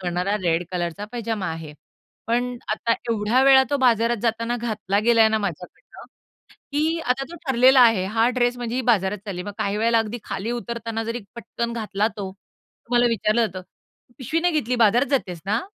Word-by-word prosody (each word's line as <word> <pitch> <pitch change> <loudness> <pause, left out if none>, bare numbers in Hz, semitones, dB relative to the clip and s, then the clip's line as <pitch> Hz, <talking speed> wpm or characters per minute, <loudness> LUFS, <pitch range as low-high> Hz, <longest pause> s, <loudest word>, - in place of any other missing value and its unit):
करणारा 180 +2 -1
रेड 170 0 +1
कलरचा 175 +2 -3
पैजामा 225 -5 -3
आहे. 160 -2 -8 0.5
पण 245 +2 -1 0.2
आता 230 +2 0 0.2
एवढ्या 225 +4 +2
वेळा 270 -1 +7
तो 285 - +2
बाजारात 235 -1 +3
जाताना 230 +1 -1
घातला 215 -4 -2
गेलाय 230 -2 +5
ना 220 0 +1
माझ्याकडनं, 180 -3 -7 0.7
की 315 +3 +1
आता 260 +2 0
तो 345 - -9
ठरलेला 260 +1 +5
आहे. 225 -6 +5
हा 225 +4 +2
ड्रेस 245 0 +2
म्हणजे 240 -1 -4
ही - - +1
बाजारात 195 0 0
चालली. 180 -3 -4
मग 205 +1 -7
काही 200 +1 -1
वेळेला 230 +2 +2
अगदी 225 +2 -2
खाली 205 +5 -4
उतरताना 230 -1 -4
जरी 230 +2 -4
पटकन 235 0 -4
घातला 215 -2 -1
तो, 195 -2 -5
तर 200 +4 -21
मला 240 0 +5
विचारलं 230 0 +1
जातं, 185 -2 -8 0.6
"पिशवी 310 +5 -1
नाही 355 0 +1
घेतली, 245 +3 -2
बाजारात 240 +6 +3
जातेस 185 - -1
ना?" 215 +4 +1
230 Hz, 180 wpm, -23 LUFS, 200-240 Hz, 0.7 s, वेळा